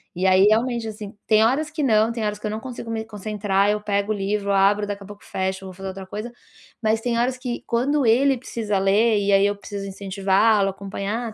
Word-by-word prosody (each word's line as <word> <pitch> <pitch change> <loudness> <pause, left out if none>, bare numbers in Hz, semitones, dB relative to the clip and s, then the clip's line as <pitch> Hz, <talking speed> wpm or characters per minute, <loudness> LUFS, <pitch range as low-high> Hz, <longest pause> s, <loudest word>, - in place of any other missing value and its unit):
e 185 +2 +1
aí 190 +1 +5
realmente, 230 +2 +2
assim, 210 -1 -8
tem 215 0 +4
horas 295 +6 +1
que 310 -1 -4
não, 220 -3 +3
tem 230 -2 -4
horas 210 0 -1
que 210 - -9
eu 210 - -1
não 215 - -3
consigo 235 -2 -7
me 220 -1 -2
concentrar, 210 -2 0
eu 210 0 -2
pego 200 0 -1
o - - 0
livro, 200 0 -1
abro, 200 +1 +3
daqui 205 0 -5
a - - -9
pouco 205 0 -12
fecho, 190 0 -3
vou 185 - -8
fazer 195 +1 -8
outra 190 0 -8
coisa, 215 +5 -6 0.5
mas 220 0 +1
tem 235 0 -1
horas 250 +2 0
que 245 -1 -4
quando 270 +4 +1
ele 260 +4 +4
precisa 220 -4 -3
ler 205 +4 +3
e 200 0 +1
aí 195 +1 +5
eu 205 - -1
preciso 200 0 -7
incentivá-lo, 195 +1 +2
acompanhar, 200 +4 -4
210 Hz, 230 wpm, -23 LUFS, 200-230 Hz, 0.5 s, aí